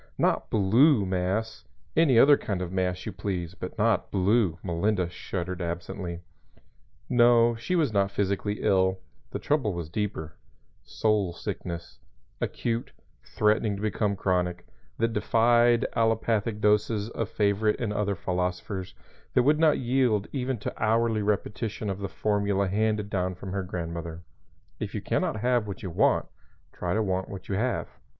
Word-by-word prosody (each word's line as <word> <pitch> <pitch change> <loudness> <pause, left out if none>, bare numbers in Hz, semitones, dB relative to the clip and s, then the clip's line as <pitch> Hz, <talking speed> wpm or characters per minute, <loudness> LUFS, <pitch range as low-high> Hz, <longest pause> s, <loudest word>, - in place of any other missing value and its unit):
"Not - - +1
blue 110 +4 +4
mass. 95 +4 -2 0.3
Any 155 -7 +4
other 145 +5 +8
kind 95 -8 -3
of 90 - -6
mass 90 -1 -1
you - - -3
please, 90 -4 -4
but 90 +2 -7
not 110 -2 +2
blue," 95 -2 +2
Melinda 90 +1 0
shuddered 90 +1 -5
absently. 85 +1 -4 0.9
No; 120 -1 +5
she 115 +11 -2
was 150 -10 +2
not 100 -1 +2
physically 100 +1 -1
ill; 95 0 +3 0.3
the - - -4
trouble 130 - 0
was 85 -2 -5
deeper 95 -7 -3 0.5
soul 105 -5 0
sickness, 85 0 -6 0.4
acute, 115 0 -2 0.3
threatening 105 - +1
to 100 - -7
become 105 -1 0
chronic, 90 -2 -1 0.3
that 115 0 0
defied 120 +1 +3
allopathic 115 -1 +1
doses 105 +1 +2
of 115 -2 -3
favorite 105 +1 +1
and 110 -4 -1
other 100 -1 0
philosophers, 90 +1 -3 0.4
that - - +5
would 150 +3 +3
not 160 -2 +4
yield 120 -5 +1
even 130 -2 -2
to 100 - -5
hourly 110 0 +2
repetition 105 0 -2
of 95 - -5
the 100 -1 -4
formula 100 -1 0
handed 105 +1 0
down 95 -2 -1
from 95 +1 -7
her 100 0 -1
grandmother 85 -2 -5 0.6
"If - - -4
you - - -2
can - - 0
not 110 - -2
have 120 -2 +2
what 100 -2 -7
you 95 - -4
want, - - +3 0.5
try 90 +1 -2
to 110 - +2
want 95 -1 -1
what 95 -2 -8
you - - -3
have." 120 +6 0
100 Hz, 155 wpm, -27 LUFS, 95-115 Hz, 0.9 s, other